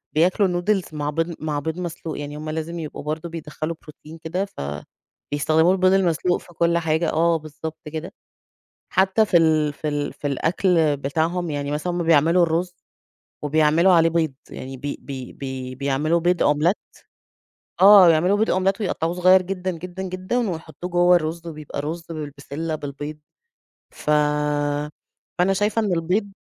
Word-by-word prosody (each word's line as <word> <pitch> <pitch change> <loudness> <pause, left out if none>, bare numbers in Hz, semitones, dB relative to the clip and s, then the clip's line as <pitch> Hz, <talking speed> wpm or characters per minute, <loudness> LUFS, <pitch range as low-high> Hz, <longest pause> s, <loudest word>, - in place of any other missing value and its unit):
بياكلوا 185 +5 +3
نودلز 180 +1 0
مع 145 -1 -2
بيض 165 +2 -2
مع 150 -2 -2
بيض 160 +4 -4
مسلوق 165 -3 -5
يعني 145 +1 -6
هم 155 +1 -6
لازم 160 +2 -4
يبقوا 155 -2 -6
برضه 155 +3 -4
بيدخّلوا 160 0 -5
بروتين 155 +1 -13
كده 175 +4 -3
ف 195 - -10 0.7
بيستخدموا 160 +4 +3
البيض 185 0 +3
المسلوق 180 -1 +2
في - - -18
كل 170 +1 +2
حاجة 160 0 0
آه، 165 +1 +2
بالضبط 155 +1 -8
كده، 165 +5 -5 0.8
حتى 190 +3 +3
في 180 - +2
ال 155 -2 +3
في 150 - -5
ال 145 -1 -2
في - - -6
الأكل 160 +1 +2
بتاعهم 160 +5 -1
يعني 145 -1 -3
مثلًا 155 +4 -2
هم 175 - -1
بيعملوا 165 +2 +4
الرز 170 +2 0 0.7
وبيعملوا 155 +5 +4
عليه 165 -1 +5
بيض 160 -4 0 0.2
يعني 130 +1 -8
بي 140 +2 -5
بي 130 -3 -7
بي 130 -1 -6
بيعملوا 140 +5 +1
بيض 175 +1 +1
أومليت 150 +6 +3 1.1
آه، 195 -2 +9
بيعملوا 175 +5 +4
بيض 220 - +1
أومليت 195 +3 +1
ويقطعوه 170 -3 -1
صغير 185 +1 +5
جدًا، 185 0 -3
جدًا، 180 +2 -7
جدًا، 190 +5 -2
ويحطوه 160 +1 -7
جوا 175 0 +4
الرز 170 0 -2
وبيبقى 155 -3 -7
رز 165 +3 -5
بالبسلة 150 +1 -5
بالبيض 145 +1 -6 0.7
ف 150 - -5 1.3
فأنا 180 +2 +3
شايفة 210 +3 +1
إن 200 -4 0
البيض 185 +5 0
165 Hz, 155 wpm, -22 LUFS, 150-180 Hz, 1.3 s, آه